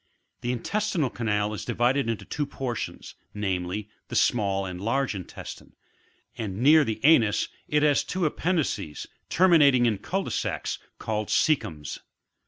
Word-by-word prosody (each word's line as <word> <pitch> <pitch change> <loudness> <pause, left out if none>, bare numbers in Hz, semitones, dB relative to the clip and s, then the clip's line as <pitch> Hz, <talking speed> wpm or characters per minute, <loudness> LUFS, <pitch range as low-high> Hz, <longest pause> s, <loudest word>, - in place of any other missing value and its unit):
The 120 - -1
intestinal 165 - -1
canal 105 -2 -1
is 105 - -5
divided 120 +2 +1
into 115 - -3
two 145 -1 -3
portions, 130 -4 -5 0.2
namely, 95 0 -2 0.2
the - - -6
small 100 -4 +2
and 90 -1 -6
the - - -8
large 135 +4 0
intes 95 -4 -7
tine, - - -18 0.6
and 105 -5 -4
near 150 +6 +6
the 110 -5 -3
anus, 115 -10 +4 0.2
it 150 0 +2
has 145 -2 +4
two 185 -1 -2
appendices, 150 - -1 0.2
terminating 150 -9 +5
in 110 -4 +1
cul 195 - -2
de - - -5
sacs, - - -2 0.2
called 110 -1 -2
coecums. 80 - 0
120 Hz, 150 wpm, -26 LUFS, 105-150 Hz, 0.6 s, near